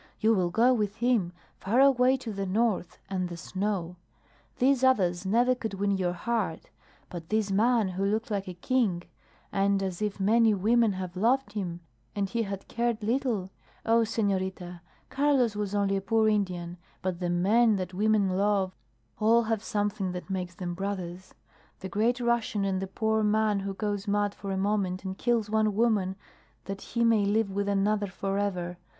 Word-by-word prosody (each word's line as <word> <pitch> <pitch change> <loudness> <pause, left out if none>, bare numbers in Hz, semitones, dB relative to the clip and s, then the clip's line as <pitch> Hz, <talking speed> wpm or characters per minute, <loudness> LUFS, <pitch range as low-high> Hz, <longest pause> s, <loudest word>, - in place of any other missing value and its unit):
You 225 +1 +4
will 185 -4 +1
go 235 +7 +4
with 210 -4 -1
him, 230 -6 +1 0.3
far 225 +6 +1
away 265 -1 +5
to 235 -4 -6
the 195 -1 -3
north 195 -4 0
and 185 -2 -2
the 170 - -7
snow. 185 -1 -3 0.6
These 265 0 +3
others 190 -8 +2
never 240 +5 +3
could 225 -5 -5
win 200 +1 0
your 185 -2 0
heart; 205 -2 -3 0.4
but 170 -2 -8
this 215 -2 0
man 220 +1 +3
who 185 +1 -3
looks 220 +3 -1
like 195 -2 -2
a 180 - -6
king, 190 -3 0 0.5
and 195 0 +1
as 185 0 -4
if 210 -1 -2
many 220 +2 +4
women 220 +2 +3
had 185 -1 -6
loved 235 +4 +1
him, 175 -5 -4 0.3
and 200 -1 0
he 230 +4 -1
had 195 -3 -5
cared 235 -2 -1
little 225 -5 -1 0.3
Oh, 230 +1 +4
senorita, 190 -5 -2 0.3
Carlos 270 -6 +2
was 205 -1 -3
only 200 -1 +1
a - - -2
poor 220 +2 +2
Indian, 180 -5 -1 0.3
but 185 -2 -2
the 175 -1 -2
men 210 +6 +3
that 185 -1 -4
women 210 +1 +2
love 195 0 +1 0.4
all 230 +2 +4
have 220 -2 -1
something 205 -3 -2
that 180 +2 -7
makes 180 -2 -3
them 175 -1 -4
brothers 185 -1 -5 0.5
the 190 - -5
Great 225 +7 +1
Russian 235 -3 0
and 190 -1 -1
the 195 - -3
poor 220 +3 0
man 210 -1 +2
who 195 0 -4
goes 205 +1 -3
mad 205 0 +1
for 200 - -8
a 190 - -1
moment 190 -2 -1
and 190 0 -3
kills 235 -3 +1
one 215 -1 +1
woman 210 -4 +1 0.5
that 195 0 -6
he 235 0 -2
may 225 -3 +4
live 205 0 +1
with 200 +1 -1
another 205 +1 +1
forever. 195 -2 -2
200 Hz, 180 wpm, -28 LUFS, 190-225 Hz, 0.6 s, away